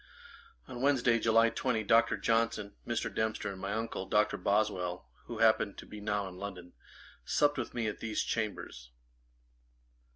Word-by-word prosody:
On 120 - -7
Wednesday, 125 -4 +3
July 115 +1 +4
20, 115 -4 -1
Dr. 115 +3 +4
Johnson, 115 -3 0
Mr. 120 -1 -2
Dempster, 110 -2 -1
and 95 -1 -9
my 100 - -3
uncle 110 -3 -3
Dr. 105 +2 +2
Boswell, 95 -4 0 0.2
who 120 - -6
happened 110 -2 +3
to - - -9
be 105 - -10
now 105 -1 -1
in 90 -1 -9
London, 90 -3 -7 0.5
supped 145 - +2
with 125 - -5
me 120 -2 -1
at 105 - -3
these 110 -1 -1
Chambers. 100 - -4
110 Hz, 155 wpm, -32 LUFS, 100-115 Hz, 0.5 s, July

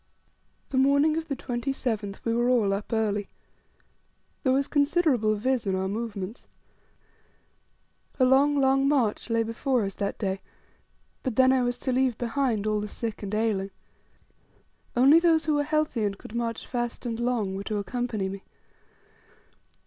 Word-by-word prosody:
The 260 - +2
morning 280 +3 +4
of 325 0 -3
the 275 - -2
27th 240 -5 -3
we 230 - +1
were 240 +1 +2
all 220 -6 +3
up 200 +4 -4
early: 210 -3 0 1.1
There 260 - +2
was 275 +1 +2
considerable 285 -7 +2
vis 245 +1 -1
in 190 - +1
our 190 0 -1
movements. 210 0 -5 1.7
A 255 - +5
long, 280 +3 +4
long 270 0 +3
march 250 -6 +1
lay 230 0 +2
before 235 +2 0
us 195 0 -3
that 200 +1 -3
day; 195 -2 -2 0.8
but 255 -4 -3
then 260 +1 +5
I 260 - +3
was 245 0 -1
to 260 - -2
leave 255 -2 +1
behind 240 -3 -1
all 215 0 +1
the 210 - -4
sick 225 +1 -5
and 205 0 -3
ailing. 210 -3 0 1.3
Only 275 +6 +7
those 330 -2 +3
who 310 - +1
were 290 0 +2
healthy, 305 -6 0
and 200 -1 -1
could 215 - -12
march 230 -1 -3
fast 240 0 -4
and 230 -1 -3
long, 235 -6 -1
were 195 - -4
to 215 0 -2
accompany 215 0 -2
me. 195 0 -7
240 Hz, 160 wpm, -26 LUFS, 210-265 Hz, 1.7 s, Only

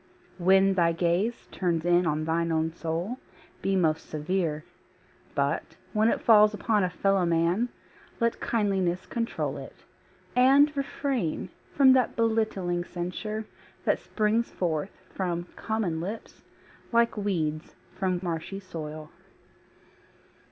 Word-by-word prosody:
When 190 +2 +5
thy 170 -3 +3
gaze 175 +7 0
Turns 170 -3 -1
in 175 0 +4
on 155 0 0
thine 165 +1 0
own 160 0 +1
soul, 170 +9 -3 0.4
be 195 - +1
most 160 -3 +1
severe. 155 0 -1 0.7
But 140 +3 -1 0.2
when 215 +1 +3
it - - 0
falls 210 -2 +6
upon 210 -1 +1
a 180 - +1
fellow 195 +1 +1
man 170 +7 +2 0.5
Let 230 -1 0
kindliness 190 -5 0
control 230 0 -2
it; - - -11 0.5
and 275 +4 +5
refrain 275 - -2 0.3
From 265 -2 +7
that 255 -3 +2
belittling 215 -6 0
censure 185 +5 -4 0.4
that - - +2
springs 220 +2 0
forth 165 0 -2 0.2
From 175 -3 -2
common 205 -8 -2
lips 205 +6 -7 0.5
like 235 0 +3
weeds 165 -7 -2 0.2
from 185 -2 -1
marshy 170 +3 -3
soil. 155 -4 -7
185 Hz, 120 wpm, -27 LUFS, 165-220 Hz, 0.7 s, From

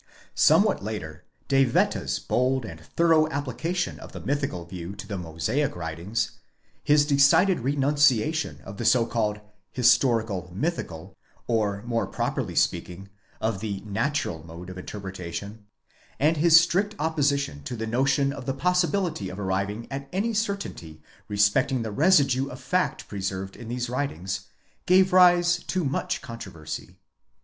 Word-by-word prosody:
Somewhat - - +4
later 90 -6 -6 0.2
De 135 0 +4
Wette's 120 - +1
bold 130 0 0
and 80 -6 -8
thorough 155 - +2
application 160 +5 -3
of - - -11
the - - -6
mythical 140 - -2
view 85 +2 -7
to 100 - -9
the 100 - -4
Mosaic 90 - -2
writings; 90 +6 -3 0.4
his 145 0 +4
decided 145 +6 +4
renunciation 145 +2 +1
of 100 +1 -9
the - - -4
so 115 0 +4
called 105 -2 -1 0.3
Azstori 120 -2 +4
cal 95 -5 -5
mythical, 95 - -4 0.3
or 105 -3 0
more 115 -1 -1
properly - - -3
speaking 95 +2 -1 0.3
of 110 -3 -1
the 100 -2 -4
natural 105 - -2
mode 85 +2 -9
of 95 - -9
interpretation; 95 +2 -7 0.5
and 155 +3 +3
his 165 +1 +7
strict 195 +5 0
opposition 140 - 0
to 125 - -4
the 110 -1 -4
notion 135 +4 +1
of 130 - -8
the 135 - -1
possibility 180 - 0
of 95 +2 -8
arriving 100 +3 -2
at 135 0 -5
any 205 +5 -1
certainty 200 - -3 0.3
respecting 105 +5 +2
the 110 - -4
residue 140 - +3
of 130 - -9
fact 180 0 -1
preserved 95 -1 -4
in 120 - -10
these 120 +1 -3
writings, 95 - -3 0.4
gave 185 +1 +5
rise 175 -1 +6
to 185 -4 -1
much 140 0 -2
controversy. 115 - -8
120 Hz, 140 wpm, -26 LUFS, 95-145 Hz, 0.5 s, his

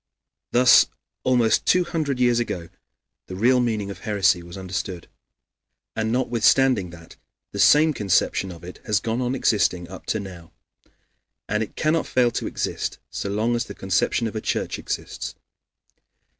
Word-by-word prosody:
Thus, 125 +1 +6 0.4
almost 120 -4 +2
two 180 0 +4
hundred 155 -6 -2
years 120 -1 +3
ago, 90 -8 -4 0.6
the 95 - -7
real 125 +6 +3
meaning 110 -5 -1
of - - -9
heresy 100 -5 +2
was 85 +2 -10
understood. 95 -2 -5 0.9
And 110 0 -1
notwithstanding 125 -3 +2
that, 85 -1 -14 0.3
the - - -6
same 155 +1 +6
conception 95 -3 +1
of 85 -1 -12
it 90 +1 -10
has 105 -2 +2
gone 115 +4 -2
on 125 +1 -1
existing 95 -8 +1
up 95 - -11
to 110 - 0
now. 90 -4 -10 0.9
And 105 +1 0
it 110 - -5
cannot 155 +1 +1
fail 125 -2 +2
to - - -3
exist - - -3
so 100 - -4
long 110 +4 0
as 120 0 -1
the 100 - -9
conception 95 +5 0
of 110 - -4
a 110 - -2
church - - -2
exists. - - -5
110 Hz, 155 wpm, -23 LUFS, 95-125 Hz, 0.9 s, Thus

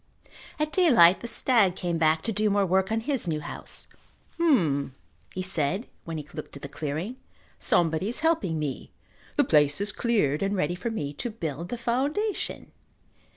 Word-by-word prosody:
At 305 -1 -1
daylight 235 - +6
the 235 - -6
stag 225 -6 +3
came 175 -3 -2
back 160 0 +3
to 225 - -1
do 210 0 +1
more 200 -1 +2
work 190 +2 +1
on 225 0 +1
his 260 -5 -2
new 155 -2 0
house. - - -6 0.5
"H'm," 155 - +2 0.4
he 185 - -4
said 185 - 0 0.2
when 165 -1 -4
he 150 -1 -7
looked - - -7
at 140 - -11
the - - -4
clearing. 155 - -4 0.4
"Somebody 165 +3 +2
is 245 - -2
helping 320 - +1
me. 150 -3 -4 0.5
The 290 - +4
place 150 - +3
is 205 +1 0
cleared 205 - +1
and 200 +1 0
ready 175 -1 0
for 185 +6 -3
me 145 -11 -3
to 240 - -4
build 170 - -5
the 245 - -3
foundation." 280 - -2
190 Hz, 175 wpm, -27 LUFS, 155-235 Hz, 0.5 s, daylight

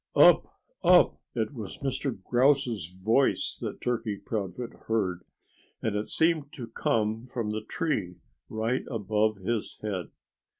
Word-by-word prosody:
"Up! - - +6 0.2
Up!" 180 -1 +6
It 115 +3 -1
was 110 -7 -7
Mr. 135 -4 -2
Grouse's 125 - +2 0.2
voice 130 +5 +3
that - - -5
Turkey 115 -4 -1
Proudfoot 105 +3 -4
heard; 100 -6 +1 0.6
and 110 -2 -1
it 105 +1 -1
seemed 160 -3 +2
to 125 - -6
come 115 0 0
from 115 -4 -3
the 110 0 -2
tree 110 - -2 0.3
right 110 +4 0
above 110 -2 +1
his 105 +3 -2
head. 95 -7 -3
115 Hz, 130 wpm, -28 LUFS, 105-130 Hz, 0.6 s, Up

